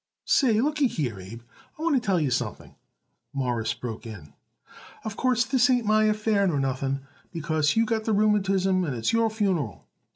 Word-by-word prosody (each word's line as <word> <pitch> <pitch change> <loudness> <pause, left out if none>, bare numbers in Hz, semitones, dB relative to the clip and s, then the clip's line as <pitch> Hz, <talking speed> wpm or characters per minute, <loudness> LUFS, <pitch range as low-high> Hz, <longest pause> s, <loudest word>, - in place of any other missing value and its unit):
"Say, 230 -6 +3
looky 295 0 +2
here, 125 - -3
Abe: 110 +6 -10 0.3
I - - -10
want 335 -2 +2
to 255 - +2
tell 195 -5 +1
you 145 -5 0
something," - - -3 0.6
Morris 120 -6 -1
broke 115 -1 -7
in. 90 -10 -10 0.7
"Of 215 -2 -4
course, 250 -1 +1
this 255 0 +3
ain't 245 -2 +2
my 215 +1 +3
affair 215 -1 +2
nor 155 -6 0
nothing, 135 0 -1 0.3
because 155 -3 0
you 225 0 +3
got 225 -2 -1
the 220 - +1
rheumatism 195 -3 +2
and 145 -7 -2
it's 115 - -1
your 230 0 +3
funeral. 185 - -2
195 Hz, 175 wpm, -26 LUFS, 135-225 Hz, 0.7 s, Say